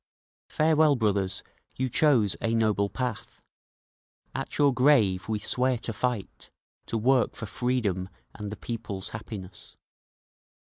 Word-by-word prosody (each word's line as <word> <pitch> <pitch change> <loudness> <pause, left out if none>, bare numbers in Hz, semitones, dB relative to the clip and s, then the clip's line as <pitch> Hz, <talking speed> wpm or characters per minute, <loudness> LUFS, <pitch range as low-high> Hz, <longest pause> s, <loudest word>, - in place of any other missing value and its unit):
Farewell, 155 -1 +4
brothers, 100 -5 0 0.3
you 130 - 0
chose 125 -6 +3
a 115 0 +1
noble 105 -3 +2
path, 125 -2 -5 0.9
At - - -4
your 145 -2 +4
grave 115 -8 +3
we 110 - +1
swear 125 +4 0
to 115 0 -4
fight, 120 -2 -3 0.4
to 115 - -1
work 125 +2 +2
for 115 - -6
freedom 105 -5 -1 0.2
and 105 -1 -6
the 105 - -6
people's 105 -5 -5
happiness…. 100 -4 -9
115 Hz, 125 wpm, -27 LUFS, 100-125 Hz, 0.9 s, Farewell